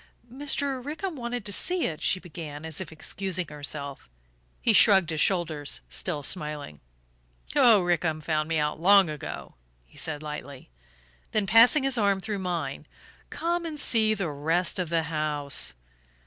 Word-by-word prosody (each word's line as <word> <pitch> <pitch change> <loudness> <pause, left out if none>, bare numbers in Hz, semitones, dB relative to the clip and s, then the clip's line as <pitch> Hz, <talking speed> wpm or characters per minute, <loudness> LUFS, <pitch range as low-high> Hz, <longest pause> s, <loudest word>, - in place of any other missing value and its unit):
"Mr. 275 -1 0
Rickham 315 +5 -4
wanted 240 -3 -4
to 200 - -3
see 360 - 0
it," 155 -3 -4
she 185 - +2
began, 155 -4 -8
as 160 +2 -4
if 170 - -7
excusing 180 +2 -3
herself. 145 - -6 0.5
He - - +3
shrugged 190 -5 +6
his 155 -2 -1
shoulders, 155 - 0
still 65 - -4
smiling. 150 - -3 0.8
"Oh, 220 -5 +6
Rickham 170 -2 0
found 155 0 -1
me 165 - +1
out 150 0 -1
long 195 -2 +6
ago," 150 - -7 0.3
he - - -11
said 155 -1 -4
lightly; 140 - -8 0.6
then, 215 -2 +1
passing 235 +7 +6
his 270 -3 +1
arm 200 -2 +2
through 200 +2 -4
mine: 180 -2 -4 0.4
"Come 345 +1 -2
and 315 -3 -5
see 220 -5 +3
the 190 -6 -3
rest 165 +6 +1
of 180 -3 -2
the 165 -1 +1
house." 150 - 0
170 Hz, 155 wpm, -27 LUFS, 150-215 Hz, 0.8 s, shrugged